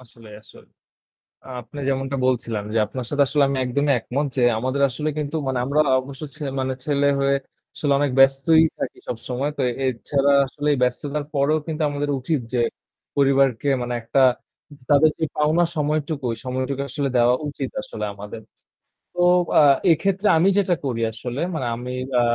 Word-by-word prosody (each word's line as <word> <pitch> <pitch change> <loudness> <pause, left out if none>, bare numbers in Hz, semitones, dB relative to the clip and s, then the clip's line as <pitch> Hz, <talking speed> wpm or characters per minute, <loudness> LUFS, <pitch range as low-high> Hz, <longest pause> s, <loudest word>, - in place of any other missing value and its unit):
আসলে, 115 -3 -16
আসলে। - - -18 0.8
আ - - -14
আপনি 120 +5 -11
যেমনটা 135 0 -2
বলছিলাম 115 -4 -1
যে - - +1
আপনার 125 +3 -6
সাথে 145 -1 +3
আসলে 145 +2 +2
আমি 135 - -1
একদমই 140 +3 +1
একমত 140 +6 -2
যে - - +2 0.2
আমাদের 130 +4 -1
আসলে 150 +5 -3
কিন্তু 150 0 -3
মানে 130 -1 -1
আমরা 145 +3 +2 0.2
অবশ্য 135 +2 -11
ছে 150 - -8 0.2
মানে 130 0 -1
ছেলে 145 -1 +1
হয়ে 140 0 +2 0.4
আসলে 145 -2 0
অনেক 145 -1 +1
ব্যস্তই 135 +4 +5
থাকি - - -4
সবসময়। 125 +4 -3
তো - - -1 0.2
এছাড়া 135 +3 +1
আসলে 145 +3 -3
ব্যস্ততার 140 +4 -1
পরেও 145 +3 +2
কিন্তু 160 0 -3
আমাদের 145 0 -3
উচিত 145 +4 -1
যে 125 - +1 0.6
পরিবারকে 135 -2 +3
মানে 120 0 -3
একটা 115 +4 +1 0.7
তাদের 150 +2 +5
যে 160 - +1
পাওনা 155 +3 +3
সময়টুকু, 150 -1 -1
ওই 115 - -5
সময়টুকু 130 +2 -2
আসলে 140 +1 -2
দেওয়া 120 +1 +4 0.2
উচিত 140 -2 -5
আসলে 185 - -6
আমাদের। 105 +2 -9 0.7
তো 175 - -2 0.4
আ - - +7 0.3
এক্ষেত্রে 195 +5 +1
আমি 175 +4 +4
যেটা 185 -3 +2
করি 120 -4 -2
আসলে 120 +4 -6
মানে 150 -6 -3
আমি 125 +2 -6 0.3
আ - - +4
140 Hz, 165 wpm, -22 LUFS, 125-150 Hz, 0.8 s, আ